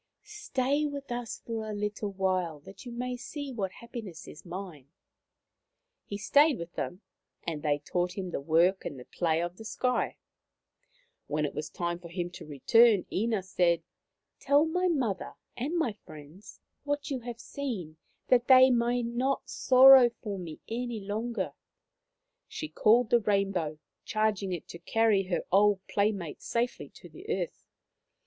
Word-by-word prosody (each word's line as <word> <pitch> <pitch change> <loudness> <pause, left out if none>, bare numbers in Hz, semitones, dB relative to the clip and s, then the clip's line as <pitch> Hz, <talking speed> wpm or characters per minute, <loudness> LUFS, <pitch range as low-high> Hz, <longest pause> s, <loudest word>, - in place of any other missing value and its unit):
Stay 300 -9 -1
with 280 -2 -7
us 240 -1 -4
for 220 -2 -4
a 210 - -4
little 210 0 -3
while 185 -5 -1
that 195 - -12
you - - -6
may 250 +1 -3
see 280 +3 -6
what 200 -6 -3
happiness 225 -8 -9
is 150 - -11
mine.,, 175 -6 -8 1.2
He 200 - -5
stayed 285 +7 +4
with 170 0 -7
them, 180 +3 -4 0.4
and 160 -3 -3
they 145 -1 +1
taught 175 +5 -2
him 185 -2 -4
the 140 - -3
work 170 +6 +3
and 135 - -6
the 125 - -11
play 165 -1 0
of 175 +1 -5
the 220 - -9
sky. 250 +3 -1 1.1
When 150 0 0
it 145 - -4
was 150 0 -4
time 170 0 -3
for 170 -1 -11
him 175 0 -4
to 175 - -10
return 210 - +4
Ina 220 -1 0
said: 180 -2 +1 0.3
" - - -57
Tell 290 +2 +4
my 360 +3 0
mother 250 - -1 0.2
and 290 +8 -2
my 255 -10 +1
friends 155 +7 -13 0.2
what 290 0 -2
you 265 - -1
have 240 -1 -7
seen, 205 - -5 0.3
that 250 -1 +3
they 260 0 +8
may 240 0 +2
not 245 +4 -1
sorrow 260 -1 +8
for 210 -4 -6
me 165 -4 -8
any 235 0 -3
longer/ 220 +4 -3 0.5
' - - -56 0.3
She 310 - -6
called 230 -1 +3
the 240 - +6
rainbow, 195 -7 0 0.3
charging 215 -3 0
it 175 -3 -5
to 170 - -9
carry 220 -3 +2
her 180 -1 -2
old 200 +1 +5
playmate 200 -6 -1
safely 240 +1 -2
to - - -14
the - - -13
earth. - - -3
210 Hz, 165 wpm, -29 LUFS, 175-245 Hz, 1.2 s, they